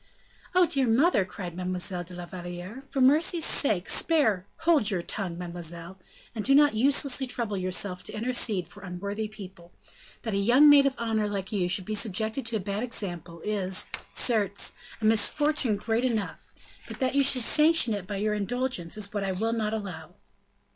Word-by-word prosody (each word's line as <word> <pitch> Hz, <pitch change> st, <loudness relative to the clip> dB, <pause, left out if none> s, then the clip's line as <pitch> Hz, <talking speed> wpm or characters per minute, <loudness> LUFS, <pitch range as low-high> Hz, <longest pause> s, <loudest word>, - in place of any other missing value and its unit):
"Oh, 365 Hz, -1 st, +6 dB
dear 275 Hz, -5 st, 0 dB
mother!" 245 Hz, -, +3 dB
cried 185 Hz, -2 st, -7 dB
Mademoiselle 180 Hz, 0 st, -3 dB
de 180 Hz, +1 st, -11 dB
la 175 Hz, 0 st, -7 dB
Valliere, 175 Hz, +6 st, -8 dB
"for 270 Hz, -, -2 dB
mercy's 315 Hz, +5 st, +3 dB
sake, 210 Hz, -10 st, +1 dB
spare 220 Hz, -, +1 dB
" -, -, -41 dB
"Hold 310 Hz, -11 st, +4 dB
your 180 Hz, -4 st, -2 dB
tongue, 180 Hz, -3 st, -3 dB
mademoiselle, 175 Hz, +1 st, -7 dB, 0.3 s
and 220 Hz, -3 st, -4 dB
do 275 Hz, -, +4 dB
not 290 Hz, -2 st, +5 dB
uselessly 270 Hz, +2 st, +2 dB
trouble 235 Hz, -4 st, -3 dB
yourself 185 Hz, 0 st, -2 dB
to -, -, -4 dB
intercede 220 Hz, -6 st, 0 dB
for 205 Hz, +3 st, -14 dB
unworthy 200 Hz, +4 st, -5 dB
people; 190 Hz, -5 st, -12 dB, 0.5 s
that 225 Hz, -, -3 dB
a -, -, +1 dB
young 240 Hz, +9 st, +5 dB
maid 285 Hz, -1 st, +7 dB
of 270 Hz, -, -2 dB
honor 220 Hz, -2 st, -1 dB
like 195 Hz, 0 st, -4 dB
you 185 Hz, -4 st, 0 dB
should 185 Hz, 0 st, -1 dB
be 215 Hz, -, -4 dB
subjected 220 Hz, +4 st, 0 dB
to 230 Hz, -, -2 dB
a -, -, 0 dB
bad 200 Hz, +2 st, -3 dB
example 175 Hz, -8 st, -4 dB
is, 190 Hz, -3 st, -1 dB, 0.3 s
certes, 205 Hz, -5 st, +1 dB, 0.3 s
a -, -, +2 dB
misfortune 245 Hz, +3 st, +2 dB
great 225 Hz, +3 st, -1 dB
enough; 225 Hz, -5 st, -3 dB, 0.4 s
but -, -, -8 dB
that 260 Hz, 0 st, 0 dB
you 280 Hz, 0 st, +3 dB
should 260 Hz, -2 st, +4 dB
sanction 305 Hz, -4 st, +4 dB
it 200 Hz, -3 st, -5 dB
by 205 Hz, -, -4 dB
your 210 Hz, +1 st, 0 dB
indulgence 210 Hz, -3 st, -2 dB
is 205 Hz, -1 st, -5 dB
what 205 Hz, -2 st, -2 dB
I 195 Hz, -, -1 dB
will 225 Hz, +5 st, -1 dB
not 215 Hz, -2 st, -1 dB
allow." 180 Hz, -6 st, -6 dB
210 Hz, 185 wpm, -27 LUFS, 185-250 Hz, 0.5 s, maid